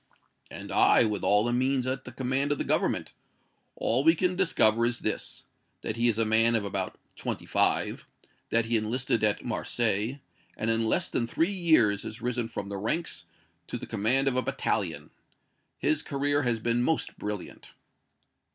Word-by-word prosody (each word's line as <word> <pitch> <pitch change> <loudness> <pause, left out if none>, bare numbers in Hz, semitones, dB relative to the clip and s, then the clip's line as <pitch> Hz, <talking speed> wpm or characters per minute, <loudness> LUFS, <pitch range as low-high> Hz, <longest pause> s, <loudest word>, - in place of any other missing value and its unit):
"And - - -8
I, - - +5
with 105 -3 -1
all 105 +1 +5
the 120 +1 0
means 130 +1 +1
at 130 +1 -3
the 125 - -8
command 130 +3 -1
of 145 - +1
the - - -2
Government. - - 0 0.6
All 125 +4 +1
we 165 +2 +5
can 180 +2 0
discover 115 - +3
is 120 0 0
this - - -4 0.4
that 110 - -3
he 120 +1 +1
is 115 -3 +1
a 115 - +2
man 115 +2 +4
of 105 -3 0
about 95 -2 -3 0.2
twenty - - -4
five; - - 0 0.4
that 115 0 +2
he 115 0 +2
enlisted 115 +1 -1
at 105 -1 +1
Marseilles, 115 +1 0 0.4
and 115 +1 0
in 115 0 +1
less - - +1
than 115 - -2
three 165 +10 0
years 155 - +3
has 110 +2 -7
risen 120 -1 -2
from 100 - -6
the 100 0 -5
ranks 100 - -3 0.4
to - - -4
the - - -7
command 120 +6 0
of 135 - +2
a 130 - +2
battalion. - - -2 0.7
His 150 +1 +1
career 145 0 0
has 120 -4 0
been 115 +2 0
most 160 +6 -1
brilliant." 105 -3 -6
120 Hz, 180 wpm, -28 LUFS, 110-135 Hz, 0.7 s, I